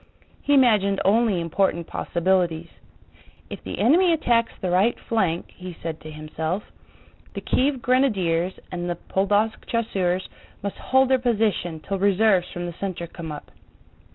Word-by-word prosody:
He 285 - +2
imagined 210 -7 +4
only 210 -1 +3
important 170 0 0
possibilities: 170 -2 0 0.8
"If - - -7
the - - -6
enemy 345 +8 +4
attacks 240 -8 +2
the 185 - -2
right 195 +7 +3
flank," 185 -7 -1
he 180 -2 -9
said 160 -1 -5
to 155 - -9
himself, 155 +5 -4 0.7
"the - - -4
Kiev 265 -2 0
grenadiers 190 -9 +2 0.2
and 175 -1 -3
the 175 - -1
Podólsk 205 +5 0
chasseurs 190 -6 -1 0.4
must 200 - -4
hold 265 0 +2
their 260 -1 +4
position 210 -9 0
till 195 +3 -3
reserves 195 -1 +3
from 175 0 -5
the 175 - -5
center 185 -3 -3
come 165 -1 -8
up. 150 - -9
190 Hz, 145 wpm, -24 LUFS, 175-230 Hz, 0.8 s, imagined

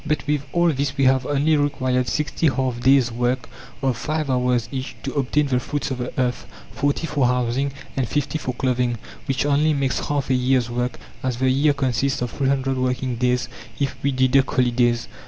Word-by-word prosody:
But 150 -1 -1
with 145 -1 +1
all 175 0 +3
this 140 0 -2
we 135 - +2
have 130 -1 +3
only 145 +2 +2
required 130 -3 0
60 150 +2 0
half 130 -2 0
days' 130 -1 +4
work 120 +1 -1 0.4
of 130 -2 +2
5 155 +1 -2
hours 125 -2 +1
each 135 0 -5
to - - -4
obtain 145 +1 +1
the 130 -3 +1
fruits 145 +2 -3
of 130 - -3
the 125 - -3
earth, 125 -1 -1 0.2
40 145 +3 0
for 145 -5 +1
housing, 125 +2 0 0.2
and 130 -3 0
50 145 +2 -1
for 130 - -3
clothing, 125 -2 0 0.3
which 135 0 0
only 145 +2 +3
makes 135 -2 -1
half 145 -2 -1
a - - +4
year's 125 -1 +2
work, 125 +1 -2 0.2
as 130 -2 -2
the 130 +1 +2
year 145 +3 +3
consists 135 -1 0
of 120 - -3
300 135 -1 0
working 125 -1 -1
days 125 +1 +1 0.3
if 140 -1 -1
we 140 - +1
deduct 130 +1 +3
holidays. 120 -1 +2
130 Hz, 195 wpm, -22 LUFS, 125-140 Hz, 0.4 s, days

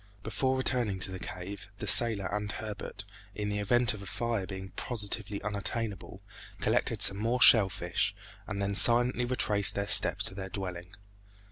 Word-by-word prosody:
Before 130 0 -1
returning 125 -6 -1
to 95 - +4
the 95 - -6
cave, 95 +2 -8
the - - -6
sailor 110 -5 +3
and 105 0 -3
Herbert, 105 -1 -7 0.3
in 105 0 -3
the 105 0 -2
event 120 +3 +1
of 105 - -9
fire 110 +1 -3
being 95 -1 -7
positively 105 -3 -2
unattainable, 105 -1 -4 0.4
collected - - 0
some 100 - +5
more 115 +4 -1
shell 110 -6 +7
fish, 90 +2 -2 0.3
and 100 -2 -5
then 100 0 -1
silently 120 +3 +4
retraced 105 -5 +2
their 100 0 -2
steps - - +4
to - - +3
their 95 -1 -7
dwelling. 90 -1 -7
105 Hz, 160 wpm, -29 LUFS, 95-115 Hz, 0.4 s, shell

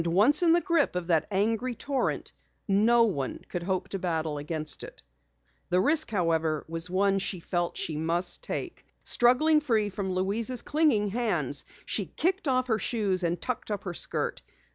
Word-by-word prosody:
Once 210 - +4
in 340 -2 +4
the 345 - +4
grip 340 - +1
of 180 -1 -2
that 165 -3 +1
angry 225 +5 0
torrent, 275 +4 -2 0.3
no 225 +4 +4
one 160 -12 -1
could 175 - -3
hope 185 +1 -2
to 195 - -5
battle 160 -4 -2
against 155 +1 -3
it. - - -10 0.7
The 180 0 +3
risk, 310 - +4
however, 165 -6 0
was 165 +2 -2
one 195 +1 +2
she 190 -1 -2
felt 175 0 -2
she 155 - -2
must 170 +3 -1
take. - - -5 0.2
Struggling 300 +6 +3
free 220 -7 +1
from 190 -1 -3
Louise's 220 +6 0
clinging 285 -10 +2
hands, 235 +2 0 0.2
she - - -1
kicked 370 0 -1
off 255 -1 +2
her 225 -3 0
shoes 200 -6 0
and 170 0 -1
tucked 250 -3 -4
up 205 -2 -3
her 180 - -4
skirt. - - -2
200 Hz, 170 wpm, -28 LUFS, 175-245 Hz, 0.7 s, Once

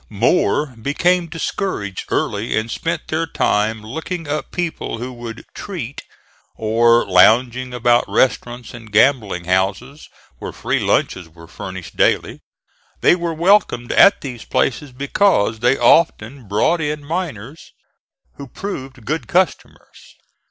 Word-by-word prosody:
More 130 - +1
became 175 +6 +1
discouraged 160 - -4
early 105 +3 -1
and 110 +1 -2
spent 165 +3 -3
their 165 +1 -1
time 110 -5 0
looking 160 +8 -5
up 150 +1 -3
people 175 -9 -3
who 125 +2 -6
would 120 -2 -8
"treat," 145 - -6 0.5
or 115 +2 +3
lounging 120 +6 +4
about 120 0 +2
restaurants 120 -2 0
and 115 -3 -11
gambling 105 -6 +2
houses 95 - -1 0.3
where - - -6
free - - -1
lunches 90 -3 0
were 85 0 -15
furnished 95 0 -9
daily. - - +1 0.6
They - - +5
were 170 -2 -3
welcomed 170 - +2
at 200 - +6
these 125 -5 -7
places 135 +2 -1
because 130 - +1
they 125 +3 +2
often 135 -7 +2
brought 110 - +1
in 150 -1 -3
miners 155 - -5 0.7
who 140 - -8
proved 130 - -7
good 145 -2 -3
customers. 185 +1 -2
125 Hz, 125 wpm, -19 LUFS, 110-160 Hz, 0.7 s, at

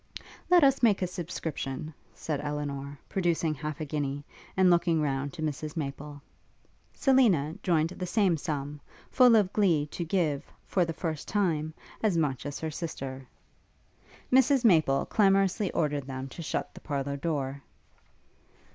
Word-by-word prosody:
'Let 355 -3 +6
us 275 -1 +4
make 210 -5 +4
a - - +3
subscription,' 160 -5 -5 0.2
said 150 -3 -3
Elinor, 145 -1 -4
producing 170 -4 0
half 150 +1 -5
a 155 - -3
guinea, 145 -1 -3 0.3
and 190 -1 +5
looking 170 -1 +3
round 140 -1 -1
to 155 - -6
Mrs 155 +1 -4
Maple. 145 0 -5 0.7
Selina 220 - +3
joined 165 -3 +2
the 180 0 -5
same 195 -3 +2
sum, 145 -1 -4 0.3
full 250 -3 +6
of 205 -3 +3
glee 175 -8 +3
to 175 - -3
give, 160 -4 0 0.2
for 180 -3 +1
the 165 - -3
first 160 -3 -4
time, 160 -6 0 0.3
as 205 -6 +2
much 145 -5 -1
as 145 - -5
her 160 -1 -2
sister. 135 -5 -6 1.1
Mrs 265 0 +4
Maple 155 -9 +4
clamorously 195 -1 +2
ordered 145 -5 -1
them 130 0 -5
to 170 - -8
shut 160 - -3
the - - -12
parlour 140 -1 -3
door. 140 -2 -3
155 Hz, 145 wpm, -28 LUFS, 145-185 Hz, 1.1 s, Let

